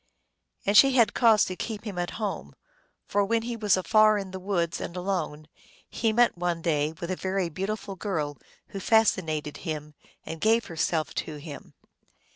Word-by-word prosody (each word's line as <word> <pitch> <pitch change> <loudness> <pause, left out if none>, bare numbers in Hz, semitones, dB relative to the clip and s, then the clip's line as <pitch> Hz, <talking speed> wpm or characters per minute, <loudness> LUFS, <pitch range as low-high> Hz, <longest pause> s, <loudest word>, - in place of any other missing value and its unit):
And 200 - +1
she 270 +5 +8
had 235 -5 +4
cause 225 -3 +5
to 185 - -5
keep 215 +2 -5
him 200 -5 -5
at 175 0 -1
home, 210 -3 -4 0.5
for, 205 - +1
when 225 +3 0
he 240 0 -3
was 210 -4 +2
afar 215 +3 +4
in 195 -2 -5
the 190 - -6
woods, 180 -3 -1
and 175 - -5
alone, 180 -5 -3 0.4
he 225 -2 0
met 240 +2 +3
one 175 -1 -2
day 150 -2 +1
with 170 +1 -4
a - - 0
very 190 -1 -1
beautiful 195 +4 -4
girl, 155 - -3 0.3
who 195 - -6
fascinated 175 -9 +1
him, 150 -3 -5 0.3
and 160 0 -7
gave 225 +2 +3
herself 160 -1 -1
to 155 - -4
him. 145 -1 -10
190 Hz, 175 wpm, -27 LUFS, 165-215 Hz, 0.5 s, she